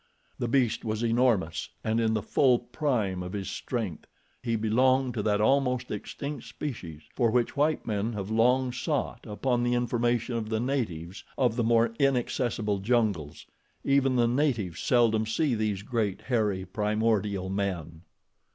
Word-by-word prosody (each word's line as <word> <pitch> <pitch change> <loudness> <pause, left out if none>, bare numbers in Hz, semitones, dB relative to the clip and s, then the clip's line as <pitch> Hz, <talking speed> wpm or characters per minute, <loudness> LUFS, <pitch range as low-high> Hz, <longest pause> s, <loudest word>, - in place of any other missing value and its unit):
The 120 - -1
beast 120 -2 +1
was 110 0 -2
enormous, 115 -8 +1
and 110 +1 +1
in 110 -1 +2
the 110 - -1
full 130 -3 +3
prime 120 - -1
of 90 0 -6
his 100 -2 -4
strength. 110 -10 -4 0.3
He 115 -2 -1
belonged 125 +4 +2
to 110 - -2
that 105 0 +1
almost 125 +1 +2
extinct 140 +6 -5
species 95 - -6
for 120 -3 +3
which 120 +1 +1
white 150 +2 +1
men 110 +1 -1
have 100 0 -5
long 125 +3 +3
sought 145 +4 -2
upon 120 +3 0
the 120 0 +1
information 120 0 0
of 110 -2 -3
the 110 0 0
natives 105 - -3
of 125 -4 +2
the 120 - 0
more 115 0 +3
inaccessible 120 -6 0
jungles. 100 -9 0 0.4
Even 135 -1 +3
the 120 -1 +3
natives 120 - 0
seldom 115 -3 +3
see 140 +4 +1
these 105 -3 -1
great, 110 -4 -1
hairy, 105 -7 0
primordial 105 -3 0
men. 90 -5 -3
115 Hz, 150 wpm, -28 LUFS, 105-125 Hz, 0.4 s, full